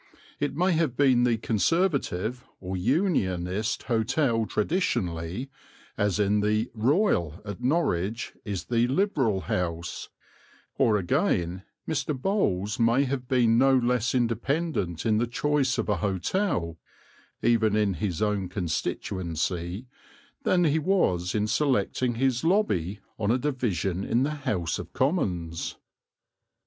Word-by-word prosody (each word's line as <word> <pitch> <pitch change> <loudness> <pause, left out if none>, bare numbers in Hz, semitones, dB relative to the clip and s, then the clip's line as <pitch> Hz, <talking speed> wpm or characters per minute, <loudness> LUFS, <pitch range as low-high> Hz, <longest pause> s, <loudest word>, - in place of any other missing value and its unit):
It 145 -1 -1
may 180 +4 +2
have 160 -7 0
been 130 -4 +4
the 120 -2 +2
Conservative 120 - 0 0.2
or 95 0 -5
Unionist 100 - 0
hotel 115 -1 +1
traditionally, 105 - -1 0.4
as 105 -5 +1
the 105 +2 +1
"Royal" 115 - +1
at 105 +2 -6
Norwich 115 - 0
is 100 -6 -4
the 120 +3 +1
Liberal 135 - +1
House; 85 -1 -3 0.7
or 110 -2 +3
again, 90 -1 0 0.3
Mr. 150 -2 -1
Bowles 110 - 0
may 115 +4 +4
have 130 -2 -3
been 120 -3 +3
no 135 0 +5
less 125 0 +1
independent 120 - -1
in 110 -1 +3
the 120 - +1
choice 135 +1 +1
of 115 - -1
a 105 -3 +1
hotel, 95 - -1 0.6
even 110 -3 +3
in 105 -2 +2
his 95 -2 -2
own 100 -3 0
constituency, 85 - -3 0.6
than 180 -9 +2
he 160 -1 +3
was 110 - +1
in 105 0 +1
selecting 125 -1 +1
his 130 +1 +1
lobby 105 - +1 0.2
on 105 -2 0
a 120 - +3
division 105 - -1
in 120 +5 +1
the 145 - 0
House 100 - -2
of 90 -1 -8
Commons. 90 - -1
115 Hz, 125 wpm, -27 LUFS, 95-135 Hz, 0.7 s, no